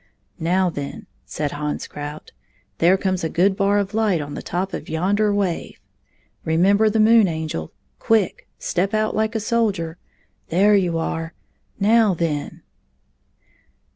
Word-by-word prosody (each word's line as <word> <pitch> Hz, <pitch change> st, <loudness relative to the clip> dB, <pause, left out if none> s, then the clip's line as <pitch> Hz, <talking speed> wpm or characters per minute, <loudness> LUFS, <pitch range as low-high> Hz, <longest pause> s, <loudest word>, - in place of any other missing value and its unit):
"Now, 180 Hz, +2 st, +1 dB
then," 140 Hz, -3 st, -6 dB, 0.2 s
said 145 Hz, -2 st, -3 dB
Hans 150 Hz, 0 st, -3 dB
Krout, 150 Hz, +1 st, -8 dB, 0.5 s
"there 180 Hz, +3 st, +5 dB
comes 185 Hz, -2 st, -1 dB
a 160 Hz, -, 0 dB
good 190 Hz, +4 st, +2 dB
bar 200 Hz, +1 st, +2 dB
of 200 Hz, -1 st, -1 dB
light 215 Hz, -5 st, +2 dB
on 145 Hz, -1 st, -6 dB
the -, -, -5 dB
top 190 Hz, +2 st, -3 dB
of -, -, -6 dB
yonder 200 Hz, +6 st, +1 dB
wave. 200 Hz, -4 st, -2 dB, 0.6 s
Remember 195 Hz, +7 st, +3 dB
the 220 Hz, +1 st, 0 dB
Moon 220 Hz, -1 st, +6 dB
Angel 160 Hz, -, -4 dB, 0.2 s
— -, -, -45 dB
quick! 220 Hz, -5 st, +2 dB
— -, -, -48 dB
step 190 Hz, +4 st, -1 dB
out 215 Hz, 0 st, 0 dB
like 220 Hz, +1 st, 0 dB
a -, -, +1 dB
soldier. 205 Hz, -7 st, -1 dB, 0.5 s
There 200 Hz, +5 st, +4 dB
you 180 Hz, -4 st, +1 dB
are 165 Hz, 0 st, -3 dB, 0.2 s
— -, -, -38 dB
now, 225 Hz, -4 st, +4 dB
then!" 155 Hz, -3 st, -3 dB
185 Hz, 155 wpm, -21 LUFS, 160-210 Hz, 0.6 s, Moon